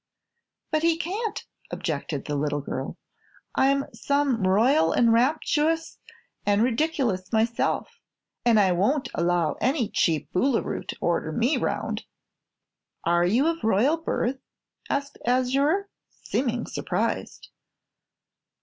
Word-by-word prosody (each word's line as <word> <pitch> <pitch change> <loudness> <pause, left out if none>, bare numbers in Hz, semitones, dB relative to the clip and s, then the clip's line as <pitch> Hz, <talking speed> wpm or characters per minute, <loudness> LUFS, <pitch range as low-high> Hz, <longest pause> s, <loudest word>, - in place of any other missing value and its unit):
"But 310 -1 +1
he 330 0 +3
can't," 405 +6 -3 0.2
objected 150 -3 -3
the 150 - -2
little 145 0 -1
girl. 135 -1 -5 0.6
"I'm 275 +1 +2
some 280 -8 +1
Royal 195 - +3
an' 235 -1 +4
Rapturous 305 +6 +1 0.4
an' 205 0 +2
Ridic'lous 240 - 0
myself, 225 +1 0 0.4
an' 235 -2 +4
I 195 -3 +4
won't 255 +10 +1
allow 170 -1 +1
any 255 -2 +1
cheap 155 -4 0
Boolooroo 245 +6 0
to - - -5
order 170 -2 0
me 240 - +1
'round." - - -2 1.0
"Are 175 +1 +3
you 240 +10 +3
of 330 -4 -1
royal 225 +9 +3
birth?" 270 -5 -2 0.5
asked 280 0 -2
Azure, 275 +10 +2 0.2
seeming 245 -3 -2
surprised. - - -3
240 Hz, 115 wpm, -25 LUFS, 185-285 Hz, 1.0 s, an